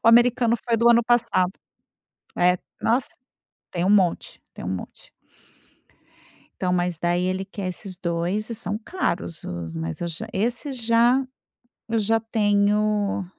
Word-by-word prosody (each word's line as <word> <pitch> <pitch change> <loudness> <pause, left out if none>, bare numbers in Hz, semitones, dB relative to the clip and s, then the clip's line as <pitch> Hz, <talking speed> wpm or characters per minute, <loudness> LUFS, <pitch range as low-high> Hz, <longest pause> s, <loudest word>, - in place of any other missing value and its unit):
o - - +7
americano 240 0 +5
foi 230 - +1
do 235 +1 +4
ano 235 0 +5
passado. 230 -6 +2 0.9
É, 180 +1 +4 0.2
nossa, 245 +3 +1 0.6
tem 175 -1 -1
um 195 - +2
monte 190 -5 +2
tem - - -9
um - - -2
monte. 95 -1 -7 1.5
Então, 180 -1 +2
mas, 175 -2 0
daí, 175 +1 +1
ele 185 +1 -1
quer 195 0 -5
esses 185 +1 -6
2 175 +5 -2
e - - -2
são 210 -2 -3
caros 195 - -3
os 85 -2 -5
mas 80 0 -4
eu - - -1
já 195 +7 -6
esse 240 +8 -1
já 240 +2 +3 0.6
eu 230 - +1
já 225 +1 +2
tenho, 210 -2 +1
205 Hz, 150 wpm, -24 LUFS, 180-230 Hz, 1.5 s, o